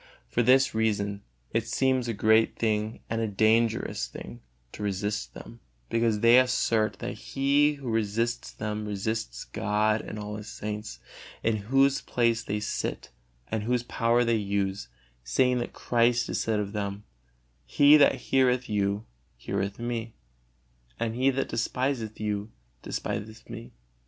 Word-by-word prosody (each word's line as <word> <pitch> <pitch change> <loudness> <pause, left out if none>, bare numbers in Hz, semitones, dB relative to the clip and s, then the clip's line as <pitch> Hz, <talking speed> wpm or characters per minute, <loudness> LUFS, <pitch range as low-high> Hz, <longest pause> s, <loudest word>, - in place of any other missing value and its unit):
For 120 - 0
this 130 +3 +4
reason 100 -2 0 0.3
it - - 0
seems 130 -2 +1
a 115 - -1
great 110 +2 +3
thing 110 0 -1
and 115 0 -2
a 110 - 0
dangerous 110 - +1
to - - -9 0.4
resist 105 +1 -2
them, - - -11 0.3
because 115 -2 +1
they 115 +2 +7
assert 115 -5 +1
that - - -4
he 140 +6 +2
who 140 -3 -9
resists 115 +1 -1
them 105 0 -4
resists 100 - -3
God 105 +1 0
and 110 - -7
all 105 0 -5
His 105 0 -9
saints, 105 0 -5 0.5
in 110 -1 +2
whose 135 +1 +4
place 115 -1 +1
they 105 - -2
sit 105 - -4 0.4
and 110 - 0
whose 120 +2 0
power 120 0 +2
they 115 -1 +2
use, 100 - -2 0.4
saying 125 - +2
that 120 - -4
Christ 120 0 +1
said 110 -2 0
of 100 0 -3
them, 100 -1 -3 0.6
"He 145 - +6
that 145 - +5
heareth 125 -1 +1
you, 100 0 0 0.3
heareth 100 +9 -3
Me, 120 -1 -4 0.8
and 115 -1 -1
he 130 +3 +2
that 135 0 -1
despiseth 120 -1 -2
you, 105 0 -2 0.3
despiseth 110 +2 -5
Me." 115 0 -8
110 Hz, 140 wpm, -27 LUFS, 105-120 Hz, 0.8 s, they